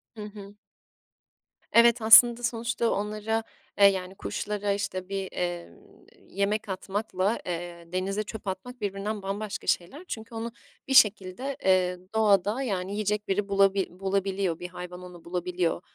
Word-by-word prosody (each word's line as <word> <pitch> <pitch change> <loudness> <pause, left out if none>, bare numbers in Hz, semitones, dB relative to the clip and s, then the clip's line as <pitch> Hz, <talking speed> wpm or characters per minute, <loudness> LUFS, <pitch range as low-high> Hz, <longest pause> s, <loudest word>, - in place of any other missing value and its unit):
Hı 215 - -7
hı. 205 -1 -10 1.2
Evet, 235 0 +6
aslında 235 +2 +8
sonuçta 235 0 0
onlara, 215 +2 -1 0.4
eee, 200 - +8
yani 190 -1 +2
kuşlara 205 +1 -3
işte 195 -2 -4
bir, 195 -1 -3
emm, 175 -1 -4 0.6
yemek 205 +1 -1
atmakla, 195 +2 -1
eee, 170 -1 -5
denize 195 +3 -1
çöp 215 0 -9
atmak 240 +6 -6
birbirinden 205 +1 -3
bambaşka 200 +2 -4
şeyler 185 - -1
çünkü 225 -3 -7
onu 230 +1 -4 0.4
bir 270 - -1
şekilde, 210 +4 +3
eee, 180 -1 +3 0.2
doğada 210 +2 +3
yani 195 -5 -2
yiyecek 210 0 -1
biri 200 +1 0
bulabi 195 -1 +3
bulabiliyor, 190 -1 -1
bir 180 - -5
hayvan 180 0 -8
onu 180 -2 -12
bulabiliyor. 175 0 -1
200 Hz, 135 wpm, -27 LUFS, 185-215 Hz, 1.2 s, aslında